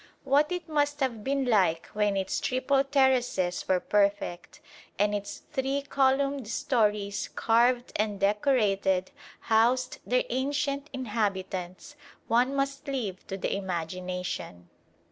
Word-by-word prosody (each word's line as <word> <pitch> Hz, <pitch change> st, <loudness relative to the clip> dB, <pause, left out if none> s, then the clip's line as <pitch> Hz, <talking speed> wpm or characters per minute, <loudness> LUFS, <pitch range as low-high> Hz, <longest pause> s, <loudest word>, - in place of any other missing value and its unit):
What 285 Hz, +4 st, +3 dB
it 360 Hz, -1 st, -3 dB
must 290 Hz, -1 st, 0 dB
have 235 Hz, -5 st, -1 dB
been 275 Hz, +1 st, 0 dB
like 185 Hz, -8 st, +2 dB
when 210 Hz, -1 st, 0 dB
its 190 Hz, 0 st, -1 dB
triple 270 Hz, +2 st, +1 dB
terraces 260 Hz, -10 st, +1 dB
were 185 Hz, -1 st, +3 dB
perfect, 200 Hz, -3 st, 0 dB, 0.4 s
and 205 Hz, +1 st, +2 dB
its 205 Hz, -1 st, -5 dB
three 270 Hz, 0 st, -1 dB
columned 275 Hz, -2 st, +1 dB
storeys, 210 Hz, -3 st, 0 dB
carved 240 Hz, +2 st, +2 dB
and 210 Hz, -1 st, -1 dB
decorated, 200 Hz, -3 st, +2 dB, 0.3 s
housed 235 Hz, +3 st, +2 dB
their -, -, +1 dB
ancient 280 Hz, +2 st, -1 dB
inhabitants, 200 Hz, -3 st, -3 dB, 0.3 s
one 250 Hz, +4 st, +2 dB
must 275 Hz, 0 st, -2 dB
leave 225 Hz, -9 st, -4 dB
to 195 Hz, -, -4 dB
the 195 Hz, -, -2 dB
imagination. 180 Hz, -, -4 dB
230 Hz, 120 wpm, -28 LUFS, 195-275 Hz, 0.4 s, What